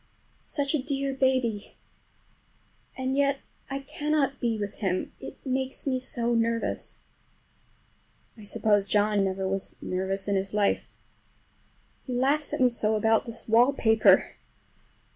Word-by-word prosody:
Such 285 -1 -1
a 305 - +1
dear 275 0 -1
baby! 255 -6 0 1.2
And 260 0 -1
yet 280 0 +2 0.3
I 275 - -2
cannot 280 0 -1
be 230 -3 0
with 205 -1 -5
him, 185 -2 -2
it - - -9
makes 265 0 -1
me 260 -2 0
so 240 -2 0
nervous. 230 0 -1 1.3
I 215 - -13
suppose 205 -1 +1
John 205 0 +2
never 190 0 -1
was 195 0 -3
nervous 190 +1 -2
in 200 - +1
his 195 +1 -2
life. 205 -1 +1 1.1
He 255 - -4
laughs 280 +4 +1
at - - -2
me 250 - +6
so 220 -2 +1
about 225 +2 +2
this 230 0 -4
wallpaper! 225 -1 +5
230 Hz, 130 wpm, -27 LUFS, 205-270 Hz, 1.3 s, me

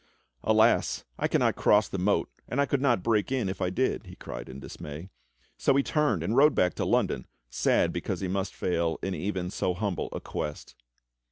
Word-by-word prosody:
"Alas! - - +3
I - - +2
cannot - - +2
cross 105 +1 +4
the 95 - -4
moat, 100 +3 +2 0.2
and 125 - -1
I 140 - +4
could 140 -1 0
not 120 -9 +2
break 110 0 +1
in 130 -6 0
if 95 +1 -4
I 90 - +1
did," 90 - -1
he - - -10
cried - - -8
in 65 +1 -8
dismay. 75 +6 -8 0.5
So 140 - +3
he 140 - +3
turned 125 - +1
and 105 +7 -1
rode 145 +2 +6
back 90 - +3
to - - 0
London 65 - +1 0.2
sad - - +2
because - - -3
he 95 - -2
must 95 0 -2
fail 85 -2 0
in 95 - -1
even 90 +1 -3
so 90 - -1
humble 100 -1 -2
a - - -4
quest. 75 -4 -5
95 Hz, 200 wpm, -28 LUFS, 90-115 Hz, 0.5 s, rode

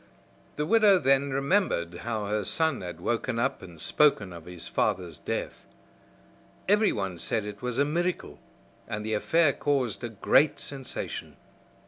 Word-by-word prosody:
The 150 - -1
widow 210 +1 +5
then 135 -2 +3
remembered 135 - +1
how 110 -3 -3
her 105 +1 -1
son 160 - +1
had 90 -3 -7
woke 120 +7 -1
up 120 +2 -1
and 85 -3 -12
spoken 100 - +2
of 85 -1 -10
his 90 -2 -6
father's 90 -6 -1
death. - - -5 1.0
Everyone 110 - +1
said 110 +4 -1
it 105 -1 -8
was 125 -1 -3
a 140 - +3
miracle, 175 +4 -2 0.5
and 105 0 -4
the 110 - -2
affair 160 +7 +3
caused 130 -6 -1
a 120 - -3
great 135 +7 +3
sensation. 135 -2 -6
120 Hz, 145 wpm, -27 LUFS, 100-150 Hz, 1.0 s, widow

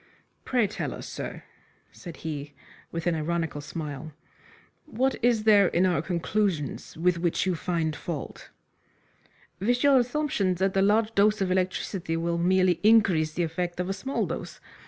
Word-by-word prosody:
"Pray 245 -4 +2
tell 205 - -4
us, - - -8
sir," - - -6 0.5
said 170 -3 -10
he, 145 -2 -5 0.4
with 165 0 -4
an 175 - +2
ironical 160 -1 -2
smile, 150 0 -6 0.7
"what 265 0 0
is 235 -3 +3
there 205 -3 +6
in 175 +2 +2
our 175 -5 +2
conclusions 170 -4 -2
with 175 +1 +1
which 170 +1 0
you 185 - +1
find 165 -2 -1
fault?" 155 -2 -6 1.1
"With 245 +7 +1
your 280 -2 +6
assumption 245 -7 0
that 190 +2 0
a 195 - +3
large 215 +3 +3
dose 210 +1 +3
of 190 -2 0
electricity 185 -2 -1
will 170 +1 -1
merely 185 0 +3
increase 195 -8 +4
the 175 - 0
effect 175 +2 -3
of 180 +1 -2
a - - 0
small 265 +8 -2
dose. - - -6
180 Hz, 155 wpm, -27 LUFS, 165-210 Hz, 1.1 s, there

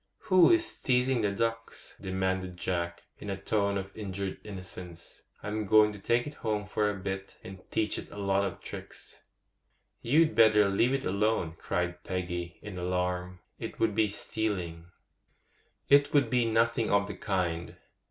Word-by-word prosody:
'Who 185 -2 +8
is 340 0 +2
teasing 125 -1 +2
the 105 - +2
ducks?' 115 +2 -3
demanded 95 -1 -2
Jack, 85 -1 -2 0.2
in 105 - -7
a 95 - -2
tone 100 0 0
of 95 0 -6
injured 100 -2 -4
innocence. 90 -4 -9 0.2
'I'm 105 0 -3
going 110 0 +6
to 105 - -9
take 120 +4 +1
it 150 - -6
home 105 -2 -1
for 105 0 0
a 105 - -2
bit, 95 0 -5
and 95 0 -9
teach 110 -2 0
it - - -9
a - - -11
lot 100 -1 +1
of 95 -3 -4
tricks.' - - -9 0.8
'You'd 155 +6 +4
better 105 -2 +6
leave 120 +7 +2
it 135 - -3
alone!' 100 -4 +1
cried 90 0 -2
Peggy, 90 -1 -4
in 100 -3 -6
alarm; 90 0 -2 0.2
'it - - -6
would 110 -2 +2
be 110 0 +3
stealing.' 95 -5 -3 1.0
'It 140 0 +5
would 140 -5 +4
be 125 -2 +3
nothing 115 0 +2
of 100 0 +3
the 105 - -5
kind. 90 -4 -2
100 Hz, 160 wpm, -30 LUFS, 90-110 Hz, 1.0 s, Who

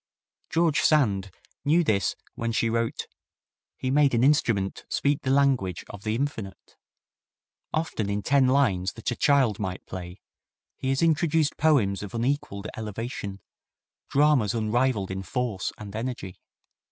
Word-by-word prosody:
George 165 -2 +2
Sand 100 -11 +2 0.3
knew 160 +4 +4
this 100 - +1 0.2
when 115 0 -2
she 115 0 +1
wrote, 115 0 -1 0.7
"He 130 - -2
made 140 -2 +4
an 115 - +2
instrument 115 -9 +2
speak 140 0 +1
the 130 - -2
language 130 - +2
of 100 - -10
the 110 0 -1
infinite. 115 -8 -5 1.0
Often 155 -10 -2
in 100 0 -2
ten 140 -1 +4
lines 105 -9 +2
that 115 +1 -3
a - - -2
child 135 -8 +3
might 95 -3 -4
play 90 0 -8 0.6
he 130 - -3
has 135 +3 +1
introduced 160 -1 +2
poems 130 -11 +2
of 105 +1 -7
unequalled 115 -5 -2
elevation, 105 -2 -5 0.7
dramas 140 -7 +3
unrivalled 110 -2 0
in 95 0 -3
force 105 0 -2
and 105 -1 -9
energy. 110 -5 -5
115 Hz, 140 wpm, -26 LUFS, 100-140 Hz, 1.0 s, knew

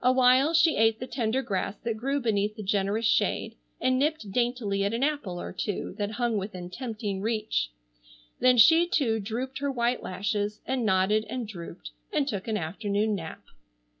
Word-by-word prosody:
Awhile 255 +4 +5
she 325 0 +4
ate 225 0 +3
the 255 - -4
tender 250 0 -1
grass 195 -1 -2
that 230 -1 -1
grew 275 +6 -1
beneath 215 -4 0
the 215 - -7
generous 200 +3 0
shade, 220 +1 +1 0.3
and 255 0 +2
nipped 295 -8 -1
daintily 235 -4 0
at 200 +3 0
an 240 - -1
apple 280 -12 -1
or - - -6
two 205 - -3
that 205 +1 -2
hung 235 -1 0
within 185 -3 -6
tempting 210 -3 -4
reach. 215 - -1 0.7
Then 255 -1 +5
she 325 +9 +7
too 245 -10 +1
drooped 240 +6 -4
her 280 0 -1
white 240 -1 0
lashes, 205 +2 -2
and 260 -2 -1
nodded 200 +3 +2
and 245 -1 -3
drooped, 170 - -9 0.2
and 280 - +1
took 205 -7 -3
an 220 -1 0
afternoon 205 +5 -1
nap. 165 -5 -6
220 Hz, 175 wpm, -27 LUFS, 200-255 Hz, 0.7 s, she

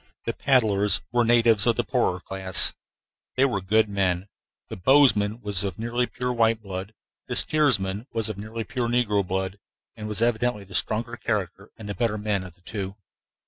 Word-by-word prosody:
The - - -2
paddlers 105 -7 +3
were 120 0 +2
natives 115 -2 +4
of 115 - +3
the 120 - 0
poorer 120 -8 0
class. 95 0 +2 0.6
They 130 - +4
were 115 -8 -1
good 110 +4 +2
men. 95 -1 -1 0.4
The - - -7
bowsman 110 -1 +3
was 105 -3 0
of 95 -4 -4
nearly 120 +2 -1
pure 125 0 -3
white 115 -1 +2
blood; 100 0 -7 0.3
the - - -4
steersman 110 -8 +2
was 115 -1 -1
of 110 - -4
nearly 110 +2 -5
pure 125 -2 -3
negro 115 -4 +1
blood, 95 +1 -3 0.4
and 105 -1 -7
was 105 +1 -1
evidently 120 -2 0
the 95 -1 -15
stronger 115 +6 +1
character 100 -3 -3
and 105 -2 -6
better 115 -3 -1
man 105 -2 -1
of 90 -2 -11
the 90 - -29
two. 95 0 -6
105 Hz, 180 wpm, -25 LUFS, 100-120 Hz, 0.6 s, natives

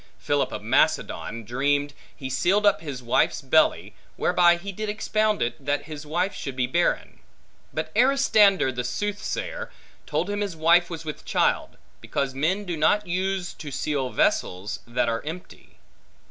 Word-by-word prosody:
Philip - - 0
of - - -6
Macedon 115 +1 +1
dreamed, 145 +5 0 0.2
he 130 - -6
sealed 190 +10 +2
up 195 -6 +4
his 140 -6 -6
wife's 120 - +2
belly; - - +2 0.2
whereby 175 -1 +4
he 195 +3 -6
did 215 +2 -4
expound 215 - 0
it, 120 +3 -4
that 145 +1 0
his 150 -1 -9
wife 180 +6 0
should 135 -2 -6
be 125 -1 +1
barren; 170 +8 0 0.5
but - - -4
Aristander 220 - +4
the 125 -1 -3
soothsayer, 205 - -3 0.4
told 155 +4 -1
him 205 0 -2
his 200 -4 -3
wife 170 +2 +4
was 165 -2 -7
with 150 - -6
child, - - 0 0.2
because 135 -1 -2
men 175 +10 0
do 175 -3 -3
not 205 +7 +2
use 185 0 -2
to 150 - -8
seal 140 -1 -2
vessels, 95 -3 0
that 120 0 0
are 115 0 -1
empty. 165 +4 -9
165 Hz, 160 wpm, -25 LUFS, 135-200 Hz, 0.5 s, up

